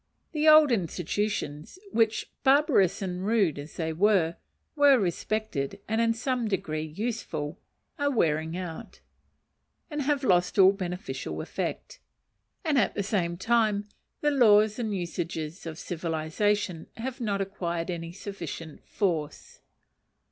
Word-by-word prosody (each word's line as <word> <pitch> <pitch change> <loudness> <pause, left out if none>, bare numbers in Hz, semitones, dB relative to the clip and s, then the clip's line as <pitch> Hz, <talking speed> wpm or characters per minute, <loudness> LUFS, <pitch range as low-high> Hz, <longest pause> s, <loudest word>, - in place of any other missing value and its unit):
The 305 -1 +1
old 310 -2 +8
institutions 180 - -2
which, 225 -4 +1
barbarous 265 - +4
and 180 -1 -3
rude 200 -8 +2
as 145 +2 -9
they 160 -1 -2
were, 175 -2 +3 0.4
were 285 -2 +6
respected 195 - -2
and 220 +1 +1
in 230 0 +2
some 245 0 -1
degree 160 -6 -2
useful, 160 -3 -4 0.4
are 285 0 +2
wearing 160 - +1
out, 175 -3 -7 0.9
and 295 0 -2
have 285 0 0
lost 180 -6 +2
all 190 -1 +8
beneficial 185 -2 -5
effect, - - -4 0.7
and 295 -4 +3
at 205 - +1
the 200 - -1
same 175 -4 -1
time 210 -1 +1 0.3
the 295 - +2
laws 215 -4 +5
and 215 -4 -1
usages 170 -1 -4
of 160 -1 -6
civilization 170 +3 -1
have 255 +2 -5
not 205 -4 0
acquired 175 -3 -3
any 165 -1 -5
sufficient 170 -5 -7
force. 165 -7 -2
195 Hz, 125 wpm, -28 LUFS, 165-225 Hz, 0.9 s, old